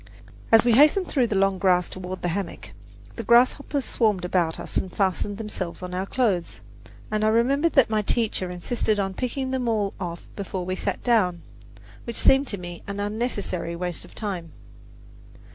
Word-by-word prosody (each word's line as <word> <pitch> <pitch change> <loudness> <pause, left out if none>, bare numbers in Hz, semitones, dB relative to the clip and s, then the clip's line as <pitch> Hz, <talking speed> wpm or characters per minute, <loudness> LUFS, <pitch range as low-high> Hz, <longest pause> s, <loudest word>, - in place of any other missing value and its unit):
As 225 +1 +7
we 240 - +4
hastened 300 - +5
through 255 -5 +2
the 215 - -2
long 195 -1 +2
grass 180 -2 +3
toward 185 0 -7
the 175 - +1
hammock, 170 - -4 0.5
the - - -4
grasshoppers 255 +3 +3
swarmed 210 -6 +1
about 175 -3 0
us - - -8
and 185 - -1
fastened 200 +1 -1
themselves 195 -5 -5
on 180 0 -6
our 185 +2 -2
clothes, 200 -10 0 0.5
and 215 0 0
I - - +4
remember 265 +8 +3
that 270 -8 +3
my 215 -1 +2
teacher 210 -3 0
insisted 210 +4 -1
upon 195 -1 -1
picking 260 +5 -3
them 255 -2 -1
all 210 -3 0
off 170 -2 -5
before 190 -2 -4
we 185 +1 -2
sat - - -3
down, 185 -8 +2 0.6
which 235 - -5
seemed 270 +1 +4
to 200 - -2
me 175 -1 -8
an 200 0 -4
unnecessary 205 -5 -2
waste 175 0 -4
of - - -16
time. 180 -8 -5
200 Hz, 180 wpm, -25 LUFS, 180-235 Hz, 0.6 s, As